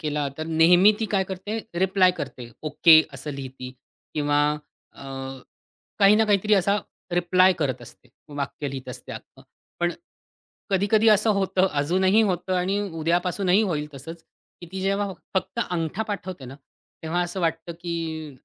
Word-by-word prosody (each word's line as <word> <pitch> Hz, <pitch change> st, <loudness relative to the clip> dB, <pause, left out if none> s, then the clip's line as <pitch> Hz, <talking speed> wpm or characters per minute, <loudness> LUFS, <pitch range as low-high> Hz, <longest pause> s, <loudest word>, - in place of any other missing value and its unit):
केला 150 Hz, -2 st, -2 dB
तर 155 Hz, -, -4 dB
नेहमी 175 Hz, +5 st, +5 dB
ती 225 Hz, -, +1 dB
काय 190 Hz, -1 st, +2 dB
करते 195 Hz, +4 st, -4 dB, 0.2 s
रिप्लाय 190 Hz, 0 st, +4 dB
करते. 120 Hz, -2 st, -7 dB
ओके 160 Hz, +1 st, +6 dB
असं 140 Hz, +2 st, -6 dB
लिहिते 130 Hz, -1 st, -8 dB, 0.4 s
किंवा 145 Hz, -1 st, +1 dB, 0.5 s
अ, -, -, -13 dB, 1.0 s
काही 200 Hz, +1 st, +7 dB
ना 220 Hz, +1 st, +3 dB
काहीतरी 210 Hz, 0 st, +2 dB
असा 200 Hz, +1 st, +3 dB, 0.3 s
रिप्लाय 180 Hz, +2 st, +4 dB
करत 135 Hz, -5 st, -1 dB
असते, -, -, -14 dB, 0.3 s
वाक्य 145 Hz, +1 st, -4 dB
लिहीत 130 Hz, -1 st, -7 dB
असते 125 Hz, -, -9 dB
अख्ख. -, -, -11 dB, 0.4 s
पण 175 Hz, 0 st, +1 dB, 0.8 s
कधी-कधी 205 Hz, +3 st, +2 dB
असं 210 Hz, +1 st, +4 dB
होतं, 190 Hz, -1 st, +2 dB
अजूनही 185 Hz, +8 st, +2 dB
होतं 185 Hz, -2 st, -1 dB
आणि 190 Hz, +3 st, 0 dB, 0.2 s
उद्यापासूनही 180 Hz, +4 st, +2 dB
होईल 150 Hz, -7 st, -1 dB
तसंच, 160 Hz, +5 st, -9 dB, 0.4 s
की -, -, -8 dB
ती 190 Hz, 0 st, -5 dB
जेव्हा 195 Hz, +1 st, 0 dB, 0.2 s
फक्त 210 Hz, +5 st, -1 dB
अंगठा 175 Hz, +4 st, -2 dB
पाठवते 185 Hz, -9 st, -6 dB
ना, 130 Hz, +2 st, -9 dB, 0.5 s
तेव्हा 170 Hz, +2 st, -1 dB
असं 175 Hz, +2 st, -5 dB
वाटतं, 165 Hz, 0 st, -1 dB
की 160 Hz, -3 st, -4 dB
175 Hz, 145 wpm, -24 LUFS, 155-195 Hz, 1.0 s, काही